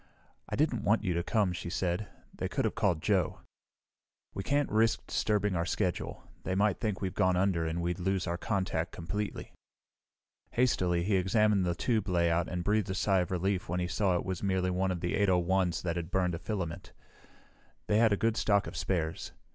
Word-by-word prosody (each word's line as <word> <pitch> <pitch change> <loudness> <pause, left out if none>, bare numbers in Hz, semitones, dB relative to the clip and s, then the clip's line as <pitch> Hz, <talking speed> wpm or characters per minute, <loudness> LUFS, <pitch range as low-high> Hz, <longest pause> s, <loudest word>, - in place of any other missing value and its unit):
"I - - -2
didn't 145 -5 +1
want 110 +2 +2
you 90 -4 0
to 85 - 0
come," 100 0 +1
she 85 - -5
said. 90 +3 -1 0.3
"They - - -3
could - - -1
have - - 0
called 100 -8 0
Joe." 95 -5 +1 0.9
"We - - -3
can't 145 +7 0
risk 110 +1 +2
disturbing 105 -2 0
our 85 - +1
schedule. 90 0 -2 0.2
They 95 - -2
might 100 -1 +2
think 105 -4 -2
we've 95 -2 -2
gone 95 -2 +2
under 90 -3 +1
and 85 +2 -2
we'd 90 +2 -1
lose 95 +1 0
our 85 -1 -1
contact 95 -6 -1
completely." 100 +5 -4 1.0
Hastily 90 -8 +2
he 100 +1 +2
examined 100 0 +2
the 85 - 0
tube 110 0 0
layout 85 -1 +2
and 90 -1 -3
breathed 105 0 +1
a 95 - -2
sigh 95 -1 +2
of 90 - -1
relief 95 0 -1
when 90 +1 -1
he 90 - -1
saw 95 0 +1
it 85 - -1
was 95 -2 -3
merely 95 -2 +1
one 95 +1 0
of 90 -2 -2
the 85 - -1
801's 95 -2 +2
that 85 -1 -1
had 85 -1 -4
burned 90 -2 +1
a 85 - -3
filament. 85 -3 -4 0.9
They 105 - +2
had 115 -1 +5
a 105 - +2
good 115 +1 +1
stock 100 -1 +2
of - - -7
spares. 85 -2 -2
95 Hz, 200 wpm, -30 LUFS, 85-105 Hz, 1.0 s, had